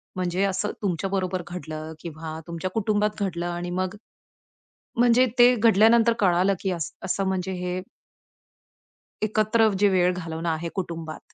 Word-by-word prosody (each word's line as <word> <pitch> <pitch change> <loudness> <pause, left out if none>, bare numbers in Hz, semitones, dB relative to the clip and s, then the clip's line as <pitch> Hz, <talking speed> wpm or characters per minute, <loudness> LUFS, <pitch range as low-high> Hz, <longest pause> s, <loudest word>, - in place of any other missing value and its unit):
म्हणजे 185 +1 -1
असं 195 +2 -1
तुमच्याबरोबर 190 0 -1
घडलं, 160 -3 -6
किंवा 160 -1 -7
तुमच्या 170 +2 -4
कुटुंबात 210 0 0
घडलं, 175 -2 -2
आणि 175 0 -4
मग 185 +2 -2 1.0
म्हणजे 245 +1 +5
ते 245 +1 +7
घडल्यानंतर 225 +1 +5
कळालं 185 +1 +3
की 190 - -1
असं 180 +4 -3
म्हणजे 190 0 -2
हे 180 0 -2 1.4
एकत्र 215 +1 +3
जे 205 - +6
वेळ 180 -1 +3
घालवणं 165 -1 -4
आहे 160 +1 -2
कुटुंबात, 165 -4 -5
185 Hz, 125 wpm, -25 LUFS, 170-210 Hz, 1.4 s, ते